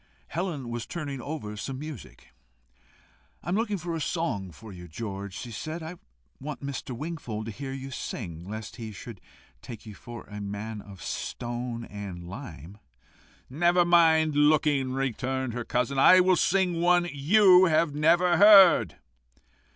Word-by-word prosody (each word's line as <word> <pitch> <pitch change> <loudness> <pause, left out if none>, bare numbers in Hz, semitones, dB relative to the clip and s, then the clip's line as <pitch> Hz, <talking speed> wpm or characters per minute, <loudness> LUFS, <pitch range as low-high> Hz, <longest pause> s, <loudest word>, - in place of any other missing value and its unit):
Helen 165 -8 -3
was 120 -1 -5
turning 145 -6 -5
over 125 -7 -6
some 130 +6 -5
music. 145 - -10 1.1
"I - - -6
am 180 - +1
looking 210 -2 0
for 170 -1 -5
a 160 - -4
song 125 - -2
for 110 +5 -12
you, 90 -1 -10
George," 100 +2 -6
she 120 - -7
said. 155 +9 -6
"I 170 +3 -7 0.4
want 145 0 -7
Mr. 135 -3 -5
Wingfold 125 -8 -5
to 115 - -5
hear 135 +5 -7
you 135 0 -7
sing, 90 -8 -6
lest 110 +2 -7
he 115 -3 -7
should 105 -1 -10 0.4
take 115 -2 -10
you 105 - -9
for 120 +3 -10
a 105 0 -9
man 105 +2 -5
of 95 -6 -12
stone 120 -1 -5
and 95 -4 -8
lime." 95 0 -10 0.7
"Never 175 +5 +2
mind 160 -3 +4
looking," 145 -3 +3
returned 130 -1 -2
her 120 0 -4
cousin. 125 +3 -1
"I 185 +7 +8
will 185 0 +4
sing 180 -2 +1
one 175 0 +3
you 185 +5 +6
have 155 -2 +2
never 170 +4 +3
heard." 200 -2 +7
135 Hz, 155 wpm, -27 LUFS, 110-165 Hz, 1.1 s, I